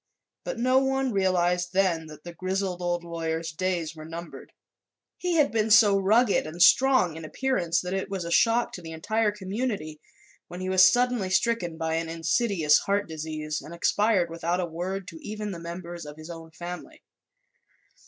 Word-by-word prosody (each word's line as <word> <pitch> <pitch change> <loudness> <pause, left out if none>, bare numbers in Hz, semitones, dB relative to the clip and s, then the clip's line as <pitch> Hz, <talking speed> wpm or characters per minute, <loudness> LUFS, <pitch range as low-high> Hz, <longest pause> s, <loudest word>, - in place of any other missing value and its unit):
But - - -4
no 255 +2 +3
one 270 -1 0
realized 180 -2 +1
then 180 -4 +1
that 150 -1 -12
the 175 - -8
grizzled 185 0 -2
old 175 -1 -1
lawyer's 165 -1 -3
days 170 -1 -2
were 155 - -9
numbered. 165 +2 -9 0.7
He 360 -1 -1
had 300 -3 +3
been 220 -1 0
so 215 -2 +7
rugged 205 +1 +3
and 160 +3 -8
strong 255 -6 +5
in 160 - -8
appearance 175 -3 0
that 180 +1 -4
it 195 0 -2
was 190 -3 -4
a 170 - -5
shock 230 +5 +3
to 180 - -8
the 165 -1 -8
entire 215 +7 0
community 195 -6 -4 0.5
when 175 - -8
he 185 0 -3
was 185 0 +7
suddenly 245 -5 +1
stricken 185 -4 0
by 160 0 -1
an 165 0 -3
insidious 165 -1 +2
heart 200 +1 -1
disease 155 -1 -4
and 170 - -10
expired 190 0 +2
without 170 +2 -1
a 180 - 0
word 180 +3 -5
to 165 - -11
even 210 0 -5
the 170 - -6
members 170 0 -7
of 150 +1 -10
his 155 +2 -9
own 165 -1 -10
family. 175 +2 -9
180 Hz, 180 wpm, -26 LUFS, 165-210 Hz, 0.7 s, so